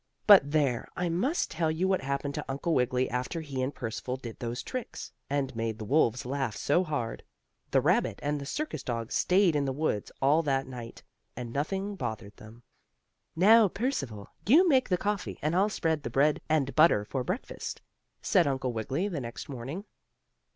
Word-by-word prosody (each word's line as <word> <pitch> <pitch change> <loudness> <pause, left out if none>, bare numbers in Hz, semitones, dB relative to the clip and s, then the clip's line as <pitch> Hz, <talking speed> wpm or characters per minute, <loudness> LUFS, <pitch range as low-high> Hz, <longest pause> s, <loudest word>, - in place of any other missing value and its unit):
But 195 -9 +8
there, 140 -6 +1
I 180 -1 -1
must 245 - 0
tell 160 -1 0
you 165 +4 0
what 190 -1 +1
happened 140 +1 -2
to - - -4
Uncle 140 +5 -1
Wiggily 125 -1 +1
after 125 +7 -3
he 140 -4 -4
and 130 +2 -1
Percival 125 +1 -4
did 120 -4 -9
those 120 0 -4
tricks, 255 -2 -6 0.2
and 135 -2 -1
made 115 -1 -2
the 110 - -6
wolves 125 0 +2
laugh 130 -4 -2
so 145 - +2
hard. 145 -9 -3 0.5
The - - +3
rabbit - - +2
and 145 0 -1
the 140 - -6
circus 300 - -3
dog 115 -4 -4
stayed 185 -3 +3
in 145 -1 +1
the 135 - 0
woods 135 -7 -2
all 145 +4 +4
that 135 -3 0
night, 120 -3 -9 0.3
and 120 -2 -6
nothing 195 +8 -2
bothered 110 - -5
them. 110 +2 -14 0.7
"Now, 215 +5 +7
Percival, 140 - -3 0.2
you 325 - +6
make 265 -5 +3
the 180 - +2
coffee, 205 +1 -2
and 155 +3 -1
I'll 195 +3 +3
spread 160 -6 0
the 130 - -4
bread 140 +5 +2
and 145 -3 +1
butter 155 -10 +5
for 130 +4 -3
breakfast," 185 - -4 0.4
said 180 -7 +3
Uncle 130 -2 -1
Wiggily 130 - -2
the 165 -8 -3
next 120 +3 -7
morning. 140 - -6
140 Hz, 185 wpm, -29 LUFS, 125-175 Hz, 0.7 s, But